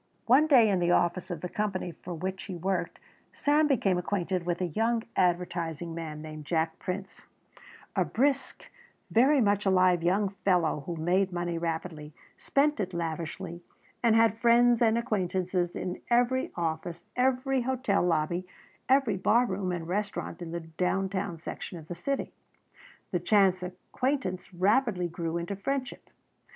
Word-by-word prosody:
One 270 Hz, +6 st, +5 dB
day 250 Hz, -7 st, +6 dB
in 195 Hz, -3 st, +2 dB
the 175 Hz, 0 st, +1 dB
office 175 Hz, +1 st, +1 dB
of 170 Hz, -4 st, -5 dB
the 180 Hz, -, -3 dB
company 190 Hz, -2 st, -2 dB
for 175 Hz, +1 st, -8 dB
which 185 Hz, +3 st, -4 dB
he 190 Hz, -, -6 dB
worked 180 Hz, 0 st, -2 dB, 0.4 s
Sam 300 Hz, +1 st, +3 dB
became 200 Hz, -10 st, +2 dB
acquainted 180 Hz, -1 st, -2 dB
with 175 Hz, -1 st, 0 dB
a 185 Hz, -, 0 dB
young 225 Hz, +6 st, 0 dB
advertising 175 Hz, -2 st, 0 dB
man 155 Hz, -2 st, -6 dB
named 155 Hz, -1 st, -8 dB
Jack 160 Hz, 0 st, -1 dB
Prince, 190 Hz, +1 st, -6 dB, 0.7 s
a -, -, +3 dB
brisk, 270 Hz, +1 st, 0 dB, 0.5 s
very 270 Hz, +6 st, +5 dB
much 205 Hz, -2 st, +2 dB
alive 185 Hz, -2 st, +4 dB
young 190 Hz, +4 st, +2 dB
fellow 175 Hz, -6 st, +2 dB
who 170 Hz, -, -3 dB
made 180 Hz, +4 st, +1 dB
money 175 Hz, -1 st, -2 dB
rapidly, 160 Hz, -2 st, -4 dB, 0.2 s
spent 290 Hz, -1 st, +1 dB
it 185 Hz, -3 st, -3 dB
lavishly, 170 Hz, +1 st, -4 dB, 0.4 s
and 230 Hz, -2 st, +4 dB
had 225 Hz, -1 st, +4 dB
friends 240 Hz, 0 st, +5 dB
and 225 Hz, -1 st, +4 dB
acquaintances 185 Hz, -5 st, -1 dB
in 180 Hz, -, -4 dB
every 245 Hz, +2 st, +2 dB
office, 170 Hz, +1 st, -3 dB
every 260 Hz, +1 st, +1 dB
hotel 250 Hz, -4 st, 0 dB
lobby, 175 Hz, +1 st, 0 dB, 0.4 s
every 260 Hz, -7 st, +3 dB
bar 235 Hz, +6 st, +3 dB
room 190 Hz, -3 st, -2 dB
and 170 Hz, -2 st, -4 dB
restaurant 195 Hz, -2 st, -3 dB
in 170 Hz, -, -5 dB
the 170 Hz, +1 st, -4 dB
down 180 Hz, +4 st, -1 dB
town 190 Hz, -3 st, -3 dB
section 165 Hz, +2 st, -7 dB
of 160 Hz, -2 st, -11 dB
the 175 Hz, -, -5 dB
city. 275 Hz, +11 st, -3 dB, 0.8 s
The 180 Hz, -, +1 dB
chance 185 Hz, 0 st, +3 dB
acquaintance 185 Hz, +3 st, -3 dB
rapidly 190 Hz, 0 st, +2 dB
grew 170 Hz, -1 st, -3 dB
into 170 Hz, +4 st, -3 dB
friendship. 255 Hz, +5 st, -4 dB
185 Hz, 155 wpm, -29 LUFS, 170-225 Hz, 0.8 s, day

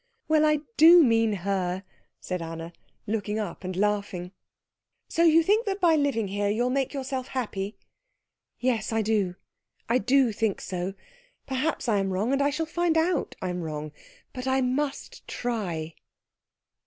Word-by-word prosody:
"Well, 310 Hz, -1 st, +4 dB
I 305 Hz, -1 st, +3 dB, 0.2 s
do 335 Hz, +2 st, +9 dB
mean 225 Hz, -3 st, +3 dB
her," 190 Hz, -1 st, -1 dB, 0.4 s
said 180 Hz, -1 st, -4 dB
Anna, 165 Hz, +1 st, -6 dB, 0.3 s
looking 210 Hz, 0 st, -2 dB
up 210 Hz, -2 st, -4 dB
and 185 Hz, 0 st, -4 dB
laughing. 200 Hz, -2 st, -1 dB, 0.8 s
"So 335 Hz, -, -1 dB
you 330 Hz, 0 st, +6 dB
think 425 Hz, +6 st, +2 dB
that 390 Hz, 0 st, -1 dB
by 340 Hz, -4 st, +5 dB
living 270 Hz, -9 st, 0 dB
here 200 Hz, +1 st, 0 dB
you'll 240 Hz, +4 st, +1 dB
make 270 Hz, 0 st, 0 dB
yourself 265 Hz, -2 st, -4 dB
happy?" 210 Hz, -5 st, -3 dB, 0.8 s
"Yes, 235 Hz, -4 st, 0 dB
I 225 Hz, 0 st, +1 dB
do 205 Hz, -4 st, 0 dB, 0.5 s
I 240 Hz, +2 st, +3 dB
do 255 Hz, +2 st, +3 dB
think 215 Hz, -1 st, -1 dB
so. 185 Hz, +1 st, -4 dB, 0.5 s
Perhaps 265 Hz, +2 st, -1 dB
I 210 Hz, -3 st, +3 dB
am 195 Hz, 0 st, 0 dB
wrong, 200 Hz, +7 st, 0 dB
and 280 Hz, +1 st, +2 dB
shall 325 Hz, +3 st, -1 dB
find 330 Hz, +1 st, 0 dB
out 325 Hz, -1 st, +1 dB
I'm 180 Hz, -1 st, -2 dB
wrong, 155 Hz, -2 st, -5 dB, 0.4 s
but 255 Hz, 0 st, -5 dB
I 265 Hz, 0 st, +2 dB
must 270 Hz, +2 st, -2 dB
try." 180 Hz, -10 st, -3 dB
225 Hz, 155 wpm, -27 LUFS, 195-280 Hz, 0.8 s, do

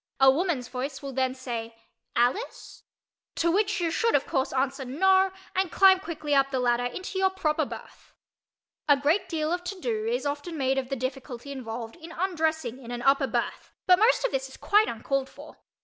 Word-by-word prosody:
A 265 Hz, 0 st, +7 dB
woman's 295 Hz, -4 st, -1 dB
voice 265 Hz, +2 st, -5 dB
will 275 Hz, -1 st, -5 dB
then 260 Hz, 0 st, 0 dB
say 235 Hz, -3 st, -5 dB, 0.4 s
"Alice?" 245 Hz, -, -1 dB, 0.5 s
to 335 Hz, 0 st, +2 dB
which 405 Hz, +2 st, +1 dB
you 335 Hz, -2 st, 0 dB
should 460 Hz, +7 st, +2 dB
of 285 Hz, -, +2 dB
course 270 Hz, -4 st, -1 dB
answer 270 Hz, +1 st, -1 dB
"No" 380 Hz, +8 st, +3 dB, 0.2 s
and 375 Hz, -2 st, +1 dB
climb 380 Hz, -1 st, +6 dB
quickly 315 Hz, -5 st, -4 dB
up 275 Hz, -1 st, +4 dB
the 265 Hz, -2 st, -1 dB
ladder 245 Hz, 0 st, +1 dB
into 370 Hz, +9 st, -4 dB
your 380 Hz, 0 st, +4 dB
proper 320 Hz, -5 st, 0 dB
berth. -, -, -11 dB, 0.8 s
A 285 Hz, -, +7 dB
great 300 Hz, +8 st, +1 dB
deal 315 Hz, -1 st, -1 dB
of 355 Hz, 0 st, -2 dB
"to 370 Hz, +1 st, -5 dB
do" 440 Hz, 0 st, -2 dB
is 480 Hz, -4 st, -1 dB
often 290 Hz, +4 st, -3 dB
made 270 Hz, -1 st, +1 dB
of 255 Hz, -1 st, -6 dB
the 275 Hz, -, -1 dB
difficulty 260 Hz, 0 st, -5 dB
involved 230 Hz, -1 st, -6 dB
in 330 Hz, 0 st, -11 dB
undressing 320 Hz, -8 st, -1 dB
in 235 Hz, -, -10 dB
an 240 Hz, 0 st, -5 dB
upper 275 Hz, 0 st, +4 dB
berth -, -, -3 dB
but 365 Hz, 0 st, +6 dB
most 460 Hz, +3 st, +4 dB
of -, -, 0 dB
this 265 Hz, 0 st, -2 dB
is -, -, -13 dB
quite 420 Hz, +1 st, +3 dB
uncalled 265 Hz, +4 st, -2 dB
for. -, -, -13 dB
285 Hz, 195 wpm, -27 LUFS, 260-370 Hz, 0.8 s, A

